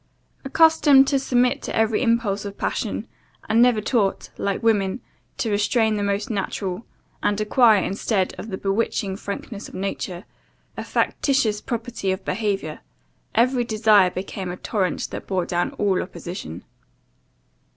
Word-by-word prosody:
Accustomed 290 -2 +5
to 275 - +2
submit 250 -2 +1
to - - -4
every 225 0 +2
impulse 230 -5 +1
of 200 -1 -7
passion, - - -2 0.4
and 225 +2 +4
never 240 -3 +4
taught, 210 -3 0
like 200 +1 -2
women, 205 -1 +2 0.4
to 225 - -1
restrain 215 +2 +2
the 205 - -2
most 200 +4 -1
natural, 195 0 -3 0.3
and 205 0 0
acquire, 215 -1 +4
instead 195 -1 -1
of 220 - -7
the 190 - -4
bewitching 195 -1 -1
frankness 200 +1 -6
of - - -12
nature, 190 0 -4 0.5
a - - -5
factitious 245 -7 +1
propriety 230 -5 -3
of 190 +1 -4
behaviour, 200 -1 -2 0.6
every 245 +2 +3
desire 215 -4 +4
became 185 +1 -5
a 180 - -5
torrent 190 -2 -1
that - - -7
bore 185 -3 0
down 175 0 0
all 195 -3 +1
opposition. 175 - -7
210 Hz, 140 wpm, -23 LUFS, 195-235 Hz, 0.6 s, Accustomed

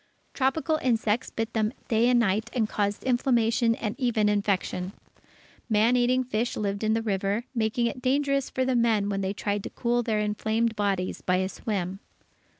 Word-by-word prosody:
Tropical 310 +4 +1
insects 225 -2 +1
bit 225 +1 -4
them 220 0 0
day 230 +1 +3
and 245 -1 +4
night 220 +1 +1
and 230 -4 +1
caused 205 -1 -2
inflammation 240 -2 +2
and 215 -2 -3
even 230 -5 +2
infection. 200 -2 -1 0.8
Man 220 +3 +4
eating 250 +1 +2
fish 240 -1 -2
lived 200 0 -2
in 220 0 +2
the 225 - -1
river, 200 +1 -1
making 230 0 0
it 250 +2 -3
dangerous 275 +1 +1
for 260 - -1
the 260 -1 +1
men 225 -4 +2
when 195 -1 -1
they 190 0 -1
tried 205 0 -2
to - - -4
cool 240 0 0
their 220 -2 -1
inflamed 220 +2 0
bodies 195 -3 -1
by 180 - +1
a 185 0 +1
swim. 195 -2 -3
220 Hz, 175 wpm, -27 LUFS, 205-240 Hz, 0.8 s, and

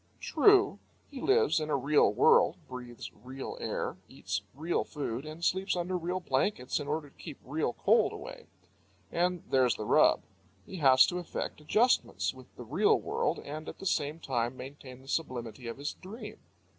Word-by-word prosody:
True, 405 -1 +4 0.3
he 270 -3 -7
lives 435 - +3
in 155 0 -3
a - - +2
real 145 -7 +4
world, 105 - +4
breathes 125 -2 -8
real 130 +2 -8
air, - - -3
eats - - -4
real 160 +4 -1
food, 140 -2 -5
and 160 +3 -5
sleeps 190 +1 +1
under 180 +1 -2
real 180 +1 -2
blankets, 135 -3 0
in 145 - -5
order 150 -1 -3
to - - -31
keep 155 -5 -7
real 145 -2 -1
cold - - +3
away. - - -9 0.6
And 180 0 0
there's 130 -3 +3
the 105 - -5
rub. - - +4 0.4
He 190 - -8
has 130 -4 +7
to 180 - -2
effect 170 -2 -5
adjustments 230 +11 +2
with - - -14
the - - -8
real 420 0 +3
world 465 +3 -1
and 155 +2 -6
at - - -9
the - - -10
same 150 -3 0
time 125 -4 -2
maintain 130 -1 -10
the - - -18
sublimity 125 -5 -3
of 115 - -5
his 145 +1 -4
dream. 215 +3 -10
155 Hz, 175 wpm, -30 LUFS, 130-180 Hz, 0.6 s, has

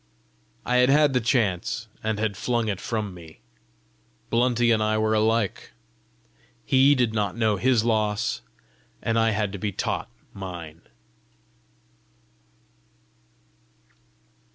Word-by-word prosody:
I 125 - +2
had 125 +1 +4
had 145 0 +4
the 125 - +2
chance, 110 -2 0 0.2
and 110 -1 -1
had 110 -2 -1
flung 120 +2 -1
it 100 -1 -3
from 110 -4 -3
me! 80 -3 -13 0.9
Blunty 120 0 +2
and 110 -1 +2
I 110 0 +1
were 110 0 +1
alike! 110 -1 0 0.9
He 135 +2 +5
did 120 -4 +1
not 105 -1 -1
know 110 -3 +1
his 125 +1 +2
loss, 110 -1 0 0.6
and 115 0 +1
I 115 0 +3
had 105 -2 -1
to 100 - -7
be 105 +2 -2
taught - - -3 0.2
mine! 85 -4 -8
110 Hz, 120 wpm, -25 LUFS, 105-120 Hz, 0.9 s, He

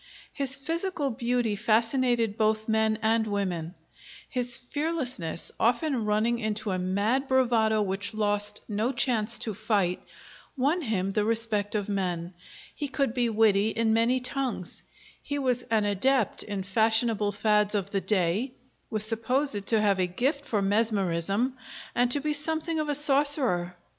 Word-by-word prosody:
His 270 -1 +1
physical 325 0 -2
beauty 240 -2 0
fascinated 230 +1 +1
both 215 0 0
men 220 -1 +2
and 220 0 +2
women; 185 -4 -3 0.5
his 245 -2 +1
fearlessness, 255 - -3
often 240 +1 +1
running 220 +3 +1
into 215 -2 -2
a 185 - -1
mad 205 +9 0
bravado 230 -5 +2
which 200 +2 -3
lost 205 -1 0
no 220 +4 -1
chance 240 -4 +2
to 220 - -1
fight, 195 -3 0 0.6
won 290 +7 +1
him 200 - -1
the 210 +1 +1
respect 220 -2 0
of 205 -2 -1
men. 180 -3 -2 0.4
He 290 - -4
could 275 -3 -1
be 245 -2 +1
witty 215 -1 +3
in 225 0 +1
many 230 +3 +2
tongues; 255 -7 -3 0.4
he 285 - -4
was 255 -3 0
an 220 -2 +2
adept 220 +4 +1
in 200 -2 -4
fashionable 220 +1 +2
fads 210 0 +2
of 200 -1 -2
the 195 -2 0
day; 205 +6 0 0.4
was 215 -2 0
supposed 225 -1 0
to 220 -2 +4
have 200 -2 +2
a 180 - +2
gift 270 - -1
for 210 -3 0
mesmerism, 205 +2 0 0.4
and 245 0 +2
to 285 - +1
be 300 +1 -1
something 320 +2 -1
of 305 -1 -2
a 290 - +1
sorcerer. 275 - +1
220 Hz, 150 wpm, -27 LUFS, 205-255 Hz, 0.6 s, to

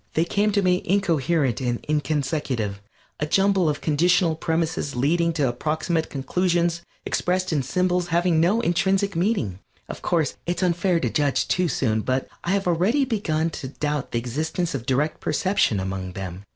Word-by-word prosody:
They 160 - +3
came 205 +4 +1
to 200 -1 +2
me 180 -1 +2
incoherent 165 - +1
and 120 -2 -1
inconsecutive, 140 -8 -1 0.4
a 150 - -1
jumble 190 0 +3
of 145 - -2
conditional 170 +2 +2
premises 160 -2 -1
leading 170 +7 +2
to 145 -4 +1
approximate 160 +6 -1
conclusions 170 +4 0 0.2
expressed 185 -1 0
in 145 - +2
symbols 180 +6 0
having 170 -1 +2
no 190 +8 +3
intrinsic 195 +1 +1
meaning. 165 - 0 0.3
Of - - -7
course, 160 -5 0
it 175 - -1
is - - -1
unfair 175 0 +2
to - - 0
judge 145 -3 +1
too 180 0 +1
soon, 110 -7 0
but 130 +3 -1 0.2
I - - -3
have 195 +1 +1
already 185 - +2
begun 165 -9 -1
to 135 - -6
doubt 145 +1 -3
the - - -1
existence 155 +9 -2
of 125 -3 -5
direct 145 +4 0
perception 190 - +1
among 95 -1 -4
them. 95 0 -7
165 Hz, 165 wpm, -24 LUFS, 135-180 Hz, 0.4 s, They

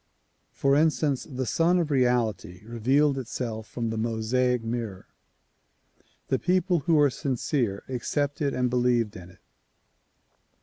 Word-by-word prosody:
For 140 0 +2
instance, 145 -3 +1
the 130 -3 -4
Sun 165 +9 +2
of 165 -4 0
Reality 120 -8 0
revealed 135 +5 +2
itself 115 -3 -5
from 115 -2 -3
the 110 - -3
Mosaic 115 +2 0
mirror. 115 -4 -4 1.2
The 130 - +1
people 180 -1 +2
who 165 +3 +1
were 145 -2 +4
sincere 125 -5 -1
accepted 140 +3 -1
and 125 -1 0
believed 120 -3 +1
in 90 -1 -10
it. 90 - -19
125 Hz, 125 wpm, -26 LUFS, 115-145 Hz, 1.2 s, were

